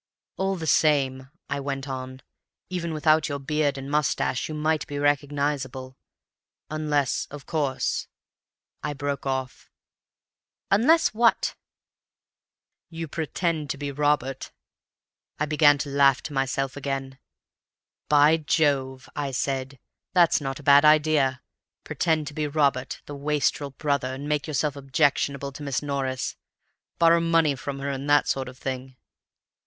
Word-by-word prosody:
"'All 195 0 0
the 165 -3 -5
same,' 135 -4 +2 0.2
I 140 0 -2
went 135 0 -4
on, 130 -1 -6 0.5
'even 170 -2 -2
without 155 0 +2
your 145 - -2
beard 145 0 0
and 135 0 -6
moustache 150 -3 0
you 155 - -4
might 155 0 0
be 145 -2 -5
recognizable. 140 -2 -1 0.8
Unless, 150 -3 0
of 145 -1 -10
course—' 145 -5 -1 0.7
I 150 0 -3
broke 140 -1 -3
off. 130 -1 -4 1.0
"'Unless 255 +12 +5
what?' 230 +1 +2 1.4
"'You 165 -1 -6
pretend 160 0 -2
to 140 - -2
be 145 0 -4
Robert.' 145 -2 0 0.9
I 155 - 0
began 150 -1 +5
to 145 0 -4
laugh 140 -1 +4
to 150 - -6
myself 135 0 -1
again. 135 -1 -4 0.9
'By 150 +2 +6
Jove!' 140 -4 0
I 145 -1 -2
said, 135 0 -2 0.4
'that's 170 -4 +5
not 135 -1 -4
a - - -12
bad 140 +1 +7
idea. 150 -4 +3 0.4
Pretend 160 -2 0
to 145 - -7
be 150 0 -2
Robert, 140 -3 0
the 145 - -8
wastrel 145 0 0
brother, 140 -2 -1
and 140 +2 -7
make 150 0 -1
yourself 150 -1 -1
objectionable 140 0 0
to 140 - -11
Miss 140 -1 -2
Norris. 135 -3 -2 0.6
Borrow 170 0 +5
money 165 -3 +3
from 140 +1 -5
her, 140 +1 -3
and 135 +1 -4
that 145 0 +4
sort 135 -1 -1
of 130 - -13
thing. 130 -1 -5
145 Hz, 140 wpm, -25 LUFS, 135-150 Hz, 1.4 s, bad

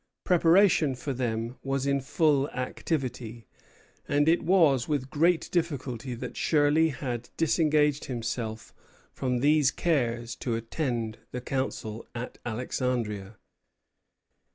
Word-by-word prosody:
Preparation 170 -4 +4
for 135 +3 -4
them 120 -1 -2
was 135 0 -1
in 140 0 +1
full 140 +1 +2
activity; 125 -3 -4 0.6
and 145 +1 +2
it 170 +2 +4
was 160 -8 +3
with 140 -3 -2
great 165 +3 +2
difficulty 135 -8 -2
that 125 +1 -7
Shirley 155 +1 +3
had 125 -4 -4
disengaged 150 -3 +2
himself 115 -3 -4 0.4
from 125 -2 -1
these 150 0 +4
cares 120 -8 -1
to 120 -3 -2
attend 115 -2 -3
the 125 - -5
council 120 -4 -3
at 120 +1 -6
Alexandria. 115 -4 -2
130 Hz, 110 wpm, -28 LUFS, 120-150 Hz, 0.6 s, Preparation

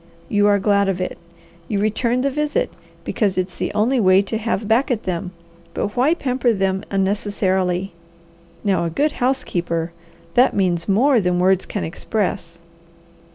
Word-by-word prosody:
You 205 0 +3
are 205 0 +4
glad 200 0 +2
of 185 -1 -1
it. 185 - -4 0.5
You 210 - -1
return 230 +4 +1
the 275 +1 0
visit, 300 +1 -1 0.3
because 200 0 -1
it's 185 0 -2
the - - -2
only 240 +5 +2
way 190 -1 +5
to 220 +3 -3
have 220 -2 -2
back 235 +7 +2
at 230 -4 -1
them; 180 0 -3 0.5
but 205 - -2
why 270 +7 +3
pamper 255 -5 0
them 190 -1 0
unnecessarily? 190 -2 0 0.7
Now 195 -4 +1
a - - -1
good 290 - +1
housekeeper, 175 - -1 0.4
that 250 +2 +4
means 180 -2 0
more 240 +5 +4
than 180 -1 +1
words 185 +1 +2
can 205 - -3
express. 170 -1 -3
200 Hz, 155 wpm, -20 LUFS, 185-235 Hz, 0.7 s, way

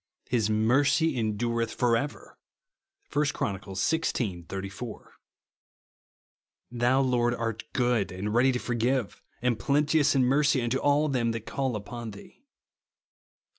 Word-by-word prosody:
"His 115 -4 +1
mercy 135 +8 +3
en 110 -3 -1
durethfor 115 +1 0
ever," 145 +5 -4 0.8
(1 150 +1 +2
Chron. 100 -10 -2
xvi. 95 - -2
84), 100 +4 -7 0.8
" - - -61
Thou, 125 +2 +2
Lord, 120 -2 +2
art 115 -2 -3
good, 120 -6 +1
and 100 +3 -4
ready 125 +3 +4
to 125 - -1
forgive, 125 -1 -1 0.2
and 120 -3 +1
plenteous 145 +4 +2
in 135 - +4
mercy 140 +2 +3
unto 120 +3 0
all 145 +1 +3
them 120 -5 0
that 115 -1 -5
call 135 -4 -2
upon 115 +3 -6
thee," 100 -1 -13
(Psa. - - -40
120 Hz, 135 wpm, -28 LUFS, 110-135 Hz, 0.8 s, ready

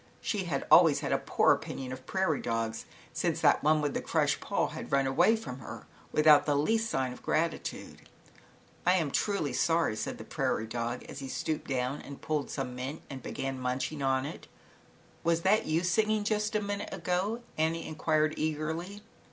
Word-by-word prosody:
She 200 -4 -2
had 145 -5 -2
always 165 -5 +7
had - - -2
a - - +2
poor - - +3
opinion 130 -1 -5
of 130 0 -10
prairie 190 -6 0
dogs 115 -1 -2 0.3
since - - 0
that - - +5
one 155 0 +4
with 145 -2 -1
the - - -1
crushed - - +1
paw - - 0
had - - -7
run 140 -1 +3
away 135 +12 +4
from 180 - -6
her, 115 - -9 0.3
without 150 -1 +6
the 145 - +3
least 220 +10 +1
sign 130 -1 -1
of - - -13
gratitude. 165 +1 -2
.^J - - -21 0.9
"I 180 - +6
am 160 -6 0
truly 200 -9 0
sorry," 165 -9 +2
said 110 - -4
the - - -8
prairie 110 - -1
dog, 120 +2 -3
as - - -9
he 135 - -6
stooped 155 +3 -3
down 130 +1 -1
and 140 - -9
pulled 150 -2 -2
some 125 -3 -4
mint 130 +5 -5
and 135 -1 -6
began 135 -1 -4
munching 130 +4 -2
it. 135 0 -1 0.8
"Was 165 0 +1
that 210 +3 +3
you 160 +2 +1
singing 215 +3 +2
just 210 0 0
a 210 - +2
minute 200 0 -3
ago?" 195 +7 -1
Annie 160 +1 0
enquired 155 0 +1
eagerly. 160 +6 -3
155 Hz, 185 wpm, -30 LUFS, 135-180 Hz, 0.9 s, always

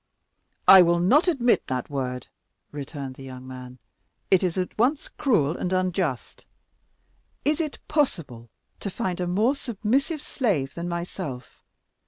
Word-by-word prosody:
"I 190 -1 +11
will 170 0 +4
not 245 - +4
admit 250 -8 +2
that 130 +1 -3
word," 125 -3 -3 0.5
returned 140 -2 -6
the 135 - -10
young 130 -1 -9
man; 125 -1 -9 0.5
"it 190 - +6
is 180 -2 -1
at 185 -1 -2
once 260 +7 +1
cruel 170 - +1
and 180 - -3
unjust. 185 -7 -2 1.0
Is 300 +3 +2
it 305 -3 -4
possible 165 - -1 0.3
to 200 - -3
find 180 -1 -3
a 180 - -1
more 210 +9 +2
submissive 275 - -1
slave 170 - -1
than 170 +1 -4
myself? 170 -7 -6
180 Hz, 140 wpm, -25 LUFS, -, 1.0 s, I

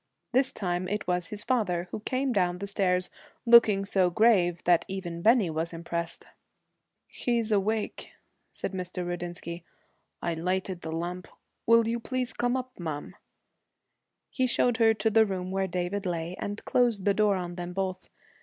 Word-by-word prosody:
This 260 +1 +3
time 180 -1 -2
it 210 +2 -2
was 180 -1 0
his 210 -1 -5
father, 190 -9 0
who - - -4
came 255 +4 -1
down 180 -3 +1
the 200 - -5
stairs, 185 -2 +1 0.3
looking 225 -4 +6
so 190 -2 +2
grave 175 -3 +3
that 175 -1 +4
even 175 -3 -5
Bennie 220 -4 +4
was 160 +2 -2
impressed. 170 0 -4 0.8
'He's 235 -2 -1
awake,' 210 +1 -1 0.4
said - - -4
Mr. 180 -1 -3
Rudinsky. 175 -1 -5 0.6
'I 170 - 0
lighted 180 +2 -2
the 160 - -5
lamp. 175 +2 -4 0.4
Will 230 0 +5
you 235 +1 -1
please 255 +1 -3
come 245 +1 0
up, 255 -2 -7
ma'am?' 155 -4 -5 1.2
He 260 -3 +1
showed 245 -1 +2
her 225 -2 +4
to 220 +1 +1
the 220 +1 +6
room 185 -1 -3
where 190 0 0
David 185 +2 -2
lay, 170 0 -3
and 205 +1 -5
closed 235 -6 +2
the 200 - +4
door 210 0 +3
on 175 -2 -4
them 175 0 -5
both. 190 0 -3
190 Hz, 165 wpm, -28 LUFS, 175-225 Hz, 1.2 s, looking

